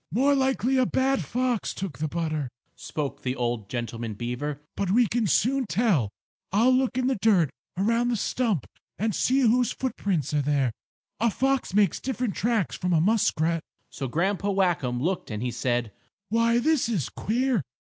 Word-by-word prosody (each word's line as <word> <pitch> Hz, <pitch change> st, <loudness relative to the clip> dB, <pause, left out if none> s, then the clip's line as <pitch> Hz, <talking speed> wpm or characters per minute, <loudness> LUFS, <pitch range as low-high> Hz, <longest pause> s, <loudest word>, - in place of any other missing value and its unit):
"More 270 Hz, -, +3 dB
likely 265 Hz, -1 st, +1 dB
a 255 Hz, -2 st, +3 dB
bad 270 Hz, +1 st, +1 dB
fox 250 Hz, -2 st, -1 dB
took 185 Hz, -9 st, -5 dB
the 155 Hz, -, 0 dB
butter," 155 Hz, -3 st, -2 dB, 0.3 s
spoke 145 Hz, -3 st, -5 dB
the 130 Hz, 0 st, -2 dB
old 120 Hz, -5 st, -2 dB
gentleman 115 Hz, -2 st, -4 dB
beaver. 125 Hz, +6 st, -4 dB, 0.2 s
"But 195 Hz, -, -1 dB
we 235 Hz, +5 st, +4 dB
can 230 Hz, 0 st, 0 dB
soon 260 Hz, +5 st, +2 dB
tell. 200 Hz, -, +2 dB, 0.4 s
I'll 225 Hz, +6 st, +4 dB
look 255 Hz, -1 st, +1 dB
in 255 Hz, -, +1 dB
the 260 Hz, -4 st, 0 dB
dirt 185 Hz, -10 st, +4 dB, 0.3 s
around 230 Hz, +5 st, +2 dB
the 245 Hz, -, +1 dB
stump 220 Hz, -, 0 dB, 0.3 s
and 215 Hz, +1 st, 0 dB
see 265 Hz, +7 st, +2 dB
whose 245 Hz, 0 st, +3 dB
footprints 190 Hz, -, -2 dB
are 150 Hz, -, +2 dB
there. 140 Hz, -3 st, +1 dB, 0.5 s
A 230 Hz, +2 st, +3 dB
fox 270 Hz, -2 st, 0 dB
makes 205 Hz, -5 st, +3 dB
different 250 Hz, -5 st, -2 dB
tracks 225 Hz, -2 st, 0 dB
from 180 Hz, -1 st, -1 dB
a 165 Hz, -, +4 dB
muskrat." 170 Hz, -4 st, +2 dB, 0.3 s
So 135 Hz, -, -4 dB
Grandpa 190 Hz, +8 st, 0 dB
Whackum 175 Hz, -11 st, +1 dB
looked 180 Hz, +8 st, -1 dB
and 105 Hz, 0 st, -4 dB
he 125 Hz, -, -1 dB
said: 120 Hz, -3 st, -1 dB, 0.4 s
"Why, 230 Hz, +2 st, +3 dB
this 270 Hz, -1 st, +2 dB
is 180 Hz, -, 0 dB
queer. 245 Hz, 0 st, 0 dB
200 Hz, 170 wpm, -26 LUFS, 150-245 Hz, 0.5 s, we